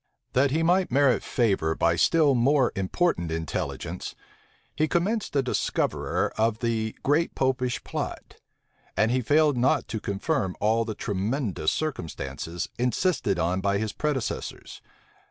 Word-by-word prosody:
That 135 +2 +4
he 160 +4 +1
might 180 +2 +3
merit 135 -1 +4
favor 95 -9 +1
by 85 0 +2
still 150 - +4
more 130 +2 +3
important 95 - 0
intelligence, 80 -2 -4 0.6
he 155 - +2
commenced 195 +4 -1
a 140 - +3
discoverer 125 - -1
of 110 0 +2
the 110 -2 -1
great 155 +4 +1
Popish 130 -2 0
plot; - - -5 0.6
and 110 +1 +3
he 130 +1 +2
failed 150 +2 +3
not 125 +2 +2
to 110 - -3
confirm 100 - -1
all 110 +2 +2
the 110 -2 -4
tremendous 100 - -1
circumstances, 85 - -4
insisted 125 - +1
on 90 +3 0
by 100 0 +1
his 110 0 -2
predecessors. 145 -6 -3
120 Hz, 135 wpm, -26 LUFS, 100-145 Hz, 0.6 s, That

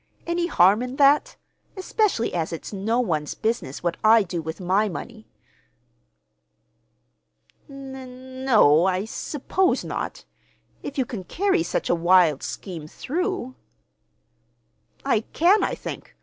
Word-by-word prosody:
Any 345 0 -1
harm 195 - +4
in 250 +1 -4
that, 280 +1 +3 0.4
especially 375 - 0
as 165 -2 -2
it's 165 +5 -7
no 215 +5 0
one's 155 -11 -1
business 220 - -3
what 175 -1 -1
I 220 0 +6
do 175 -2 -4
with 160 +3 -6
my 195 +4 +1
money?" 220 +4 -8 2.4
"N—no, 260 - +1
I 190 +1 0
suppose 310 +10 -1
not—if 285 - -8
you 260 - +1
can 220 -6 -6
carry 380 - 0
such - - -2
a - - +2
wild 175 -3 +4
scheme 170 -6 -6
through." 345 - -3 1.5
"I 265 -5 +3
can, 370 +6 +4
I - - -1
think. - - -8
230 Hz, 120 wpm, -24 LUFS, 180-275 Hz, 2.4 s, I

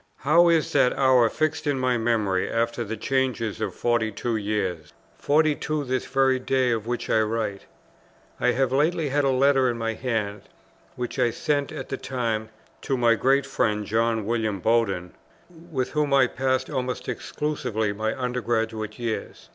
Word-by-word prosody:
How 170 +4 +4
is 165 -4 +2
that 125 - +3
hour 130 -4 +5
fixed 155 +2 -1
in 145 -2 +1
my 130 -1 +1
memory 110 -5 0
after 115 +1 -1
the 110 0 -5
changes 115 -3 -1
of - - -3
forty 120 -2 +1
two 115 +3 -2
years, 100 -6 -2 0.3
forty 155 +1 +3
two 150 0 -3
this 130 -1 -2
very 135 -1 +2
day 130 -1 +1
on 115 - -1
which 120 +1 -3
I 110 - +3
write! 110 -2 -2 0.7
I - - +1
have 135 -1 +1
lately 155 +3 +1
had 145 +2 +1
a - - +3
letter 135 0 +3
in 120 - -2
my 115 0 -2
hands, 110 -4 -3 0.5
which 125 -1 -4
I 120 - +3
sent 145 +4 -1
at - - -7
the 135 - -3
time 115 -5 -2 0.3
to 135 - -1
my 120 -1 +4
great 135 +4 +2
friend, 105 -6 0
John 115 0 0
William 110 -3 -1
Bowden, 100 -5 0 0.6
with 130 -4 -2
whom 150 -2 +1
I 135 - +6
passed 130 +1 -1
almost 130 -3 -3
exclusively 120 -8 -2
my 110 +4 -3
Under 125 0 -2
graduate 110 -1 -2
years. 115 -2 -5
120 Hz, 170 wpm, -25 LUFS, 110-135 Hz, 0.7 s, I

